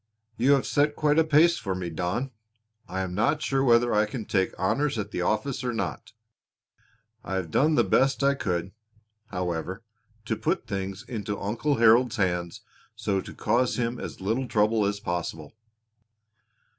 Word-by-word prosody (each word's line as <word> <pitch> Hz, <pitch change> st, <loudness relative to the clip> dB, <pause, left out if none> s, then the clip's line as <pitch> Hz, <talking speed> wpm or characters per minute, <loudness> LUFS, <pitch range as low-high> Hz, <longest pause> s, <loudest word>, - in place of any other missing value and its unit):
"You 130 Hz, +5 st, +4 dB
have 135 Hz, -, +2 dB
set 145 Hz, 0 st, +1 dB
quite 150 Hz, 0 st, +2 dB
a -, -, +6 dB
pace 160 Hz, +2 st, +4 dB
for 95 Hz, -2 st, -3 dB
me, 90 Hz, -2 st, -4 dB
Don! 90 Hz, +11 st, -2 dB, 0.6 s
I 95 Hz, +1 st, -3 dB
am 95 Hz, -1 st, -4 dB
not 120 Hz, +10 st, +1 dB
sure 135 Hz, -1 st, +1 dB
whether 120 Hz, -1 st, +4 dB
I 105 Hz, 0 st, +3 dB
can 110 Hz, 0 st, -6 dB
take 95 Hz, -2 st, +1 dB
honors 135 Hz, +7 st, 0 dB
at 105 Hz, -1 st, -4 dB
the -, -, -2 dB
office 120 Hz, +8 st, -1 dB
or 125 Hz, -1 st, -1 dB
not. 110 Hz, -, -4 dB, 1.1 s
I 95 Hz, -, -4 dB
have 90 Hz, -4 st, -3 dB
done 155 Hz, -, +3 dB
the -, -, +4 dB
best 135 Hz, +1 st, +2 dB
I 140 Hz, 0 st, +4 dB
could, 95 Hz, -8 st, -2 dB, 0.6 s
however, 90 Hz, +2 st, -4 dB, 0.4 s
to 110 Hz, -, -1 dB
put 165 Hz, -, -1 dB
things 95 Hz, -3 st, -4 dB
into 105 Hz, -4 st, -4 dB
Uncle 120 Hz, +9 st, -1 dB
Harold's 120 Hz, +2 st, +5 dB
hands 90 Hz, -5 st, -1 dB, 0.3 s
so 95 Hz, -1 st, -1 dB
to -, -, -10 dB
cause 120 Hz, +3 st, +1 dB
him 120 Hz, 0 st, -2 dB
as -, -, -7 dB
little 115 Hz, +7 st, -1 dB
trouble 105 Hz, -1 st, +2 dB
as 100 Hz, 0 st, -2 dB
possible." 85 Hz, -5 st, -4 dB
110 Hz, 170 wpm, -26 LUFS, 95-135 Hz, 1.1 s, a